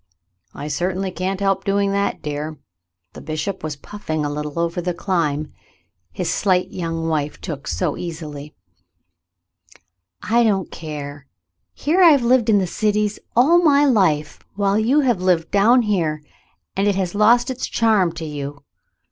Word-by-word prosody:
"I 145 - -6
certainly 185 +5 -2
can't 185 +1 -3
help 195 -1 +1
doing 200 0 +1
that, 200 0 -1
dear." 150 +1 -4 0.6
The - - -10
bishop 155 +5 -4
was 155 -2 -3
puffing 155 -1 -4
a 145 - -2
little 150 +1 -5
over 170 +1 -1
the 180 0 -2
climb 160 -5 -1 0.6
his 180 - -4
slight 185 -3 +1
young 165 -2 -3
wife 150 -2 -2
took 145 -5 -6
so 175 -6 -1
easily. 155 -4 -7 1.7
"I 235 +2 +3
don't 195 -5 0
care. 145 -3 -7 0.5
Here 335 +6 +1
I've 295 -7 +6
lived 235 -1 +3
in 200 -3 +4
cities 210 +2 0 0.2
all 310 +9 +5
my 290 -3 +5
life, 175 - +2 0.2
while 200 0 +1
you 255 +7 +3
have 240 -9 +1
lived 180 -3 +1
down 230 +5 +4
here, 165 -8 -1 0.5
and 195 +1 +1
it 200 - +2
has 185 -2 -2
lost 235 +5 +4
its 255 - -4
charm 215 -6 +2
to 165 -1 -6
you. 145 -1 -6
185 Hz, 150 wpm, -21 LUFS, 155-210 Hz, 1.7 s, I've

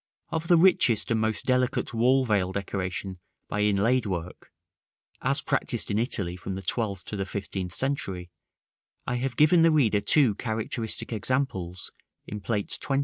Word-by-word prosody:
Of 160 0 -3
the 175 - +6
richest 165 - +4
and 115 - +2
most 110 -1 0
delicate 125 -1 +1
wall 130 +3 +3
veil 100 -5 +1
decoration 95 -1 -4 0.3
by 105 - -3
inlaid 105 +4 +2
work, 90 -2 -5 0.7
as - - 0
practised - - -1
in 105 - +1
Italy 100 -7 -1
from 95 +1 -6
the 95 - -6
twelfth 100 -5 -1
to - - -6
the 100 - -1
fifteenth 95 -2 -4
century, 95 - -3 0.7
I 125 - -1
have 125 -1 -3
given 155 +3 +5
the 165 - +6
reader 120 -10 +3
two 130 -1 +4
characteristic 110 +1 -3
examples 100 -7 -2 0.3
in 105 0 -6
Plates 105 -1 -1
XX. 135 -1 0
110 Hz, 155 wpm, -27 LUFS, 95-130 Hz, 0.7 s, the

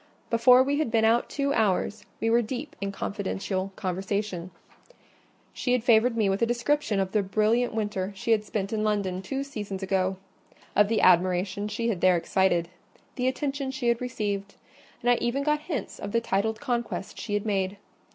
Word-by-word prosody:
Before 250 +2 +6
we 285 +2 0
had 310 - 0
been 225 -1 +3
out 230 +2 +3
two 280 -1 0
hours, 210 -1 0
we 225 - -1
were 235 +1 +5
deep 255 +6 -5
in 200 - -1
a - - -4
confidential 195 -1 -3
conversation: 190 -1 -3 1.0
she 250 - -1
had 250 -3 +1
favoured 230 0 +4
me 215 -3 +3
with 195 +2 0
a 230 - +3
description 240 -2 0
of 190 -1 -1
the 210 - +2
brilliant 215 +5 +1
winter 205 -3 -2
she 230 +4 -2
had 215 -2 +3
spent 205 -1 -3
in 215 -1 0
London 200 -3 0
two 270 +8 -3
seasons 205 -8 -6
ago—of 190 +2 -1
the 220 0 +1
admiration 185 +3 +3
she 230 +3 -2
had 195 -6 -2
there 185 -1 +5
excited—the 180 +7 -1
attention 275 +1 -2
she 260 -2 -1
had 235 0 +1
received; 205 -5 -3 0.5
and 245 - +4
I 240 - +4
even 240 +4 0
got 300 +1 +2
hints 300 - -5
of 200 - -6
the 230 - +4
titled 220 0 -1
conquest 235 -6 -3
she 205 - -3
had 205 - -1
made. 195 -1 -1
215 Hz, 180 wpm, -27 LUFS, 195-240 Hz, 1.0 s, Before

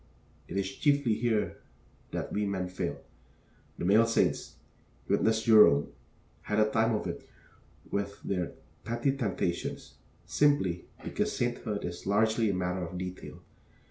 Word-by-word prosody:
It - - -4
is 100 -1 0
chiefly 140 -6 +3
here 110 -1 0 0.5
that - - -4
we 105 0 0
men 95 -2 -2
fail. 90 - -4 0.7
The - - -3
male 110 +5 +5
saints 115 - +1 0.5
witness 110 0 +2
Jerome 105 -11 +6 0.5
had 105 0 -1
a 110 0 +3
time 110 0 +2
of 105 - -3
it - - -6 0.6
with 100 0 -2
their 90 -3 -2 0.3
petty 120 +4 0
temptations, 95 -8 -3 0.3
simply 145 -13 +2 0.2
because - - -1
sainthood 120 -4 -2
is 90 +1 -6
largely 110 +2 +3
a - - +1
matter 90 0 -1
of 85 +2 -6
detail. 90 0 -7
105 Hz, 135 wpm, -30 LUFS, 90-115 Hz, 0.7 s, Jerome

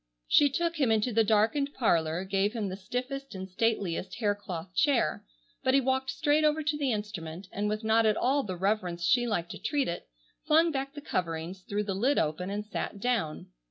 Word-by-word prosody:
She 290 -1 +5
took 335 +4 -1
him 270 -6 +2
into 220 +2 +1
the 225 +1 +4
darkened 225 +7 +2
parlor, 170 -7 +1
gave 195 +2 0
him 215 -4 -2
the 185 - -4
stiffest 255 +6 -5
and 190 0 -5
stateliest 195 -3 -1
hair 210 -3 +1
cloth 185 -3 -7
chair; 270 - +2 0.4
but 260 +1 +3
he - - +6
walked 265 0 0
straight 295 +1 +2
over 305 +1 +2
to 295 0 0
the 285 -3 0
instrument, 195 -5 -5
and 210 +1 -1
with 215 +1 -2
not 220 0 +4
at 215 - +2
all 275 +3 +2
the 185 -8 -5
reverence 180 -3 -1
she 240 +5 +3
liked 175 -6 -1
to - - -8
treat 285 -2 0
it, 170 - -4 0.4
flung 325 +2 +5
back 275 -1 -3
the 290 - -7
coverings, 170 - -3
threw 205 +1 0
the 200 -2 -2
lid 250 +9 +1
open, 155 +5 0
and 205 +1 -3
sat 210 -1 -4
down. 205 - -1
215 Hz, 205 wpm, -29 LUFS, 190-270 Hz, 0.4 s, he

